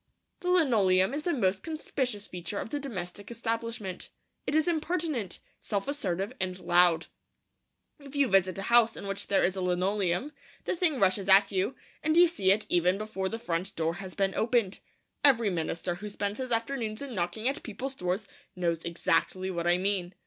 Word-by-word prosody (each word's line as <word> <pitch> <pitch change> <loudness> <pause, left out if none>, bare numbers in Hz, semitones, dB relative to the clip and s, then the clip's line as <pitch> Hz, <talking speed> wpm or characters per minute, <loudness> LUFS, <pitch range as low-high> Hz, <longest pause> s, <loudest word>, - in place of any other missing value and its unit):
The 360 - -3
linoleum 220 - +4
is 295 - -2
the 345 - -1
most 190 - +1
conspicuous 260 -9 -3
feature 180 +3 -5
of 220 - -4
the 290 - -1
domestic 205 -7 -6
establishment. 230 -4 -4 0.4
It - - 0
is 315 +2 +3
impertinent, 315 - -1 0.2
self 200 -2 -2
assertive, 195 -9 -2
and 185 0 -2
loud. 175 -1 +4 0.9
If 280 0 -12
you 285 -1 +3
visit 190 -3 +3
a 195 - -4
house 235 0 +4
in - - -7
which 195 0 -3
there 200 - +3
is 185 +2 +1
a 190 - -3
linoleum, 180 - 0 0.3
the - - 0
thing 330 -6 +2
rushes 195 0 +2
at 195 +1 +8
you, 195 +7 0 0.3
and 310 +1 +1
you 350 0 +8
see 250 - +2
it 210 +2 +1
even 180 +2 +2
before 195 -3 -3
the 225 - -4
front 185 -5 -3
door 165 0 0
has 190 -1 -8
been 195 -1 +1
opened. 225 -4 +1 0.4
Every 235 -7 +5
minister 170 +1 -2
who 205 +4 -7
spends 205 +2 -3
his 255 -1 -4
afternoons 230 0 -1
in 275 -3 -6
knocking 185 +4 -2
at 270 - -1
people's 255 +5 -5
doors 190 -2 -2 0.3
knows 170 -2 -1
exactly 170 +2 0
what 170 -1 -2
I 175 0 +4
mean. 185 -1 -1
200 Hz, 185 wpm, -29 LUFS, 185-250 Hz, 0.9 s, at